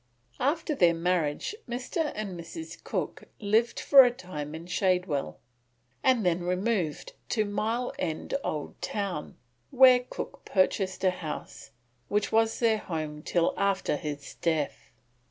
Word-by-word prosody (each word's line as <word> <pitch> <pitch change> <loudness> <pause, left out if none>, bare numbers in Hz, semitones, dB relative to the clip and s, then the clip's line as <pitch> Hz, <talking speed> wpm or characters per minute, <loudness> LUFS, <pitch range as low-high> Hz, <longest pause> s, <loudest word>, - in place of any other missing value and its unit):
After 305 +4 +1
their 175 - +4
marriage 165 - 0 0.2
Mr. 255 +6 -2
and 215 -1 -3
Mrs. 175 - -8
Cook - - -3
lived 220 +3 +2
for 275 -2 +8
a 250 - +4
time 155 -10 -6
in 165 +1 -8
Shadwell, 180 -5 0 0.7
and 250 -6 +3
then 175 0 +2
removed 180 -2 -1 0.2
to 215 -2 +1
Mile 225 +4 -1
End 160 -3 -3
Old 150 -2 -4
Town, 195 -7 -3 0.3
where 255 -1 +7
Cook 250 - -7
purchased 190 -1 +1
a 185 - +5
house, 155 -5 -7 0.4
which 205 0 0
was 225 0 +3
their 225 -2 +3
home 155 -5 -4
till 170 +2 +1
after 200 -5 +1
his 145 -1 -5
death. 160 -4 -1
190 Hz, 135 wpm, -28 LUFS, 165-230 Hz, 0.7 s, for